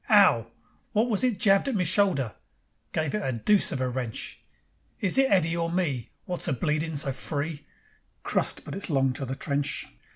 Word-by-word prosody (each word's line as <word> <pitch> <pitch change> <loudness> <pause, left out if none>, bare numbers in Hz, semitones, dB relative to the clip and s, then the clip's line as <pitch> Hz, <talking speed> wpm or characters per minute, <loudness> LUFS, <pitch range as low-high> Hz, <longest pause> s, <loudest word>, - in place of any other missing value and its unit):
'Ow! 185 - +5 0.5
Wot 225 +3 +2
was 210 - +1
it 245 -5 +1
jabbed 195 +3 +3
at 270 - -1
me 185 - +1
shoulder? 170 - +2 0.6
Gave 155 -2 -2
it 210 - -1
a 135 - -1
dooce 200 - +4
of 140 - -3
a 130 - 0
wrench. 125 -3 -4 0.6
Is 200 +6 +3
it 270 0 +4
Eddy 170 -4 +2
or 165 0 -1
me 150 -10 -2 0.2
Wot's 180 -1 +1
a 155 - +1
bleedin' 150 +4 -1
so 140 -1 +2
free? 145 +2 -4 0.6
Crust! - - 0
but - - -7
it's 200 0 -1
long 135 -3 +1
to 135 - -5
the 130 +1 -4
trench. 140 -2 -1
160 Hz, 190 wpm, -26 LUFS, 135-195 Hz, 0.6 s, Ow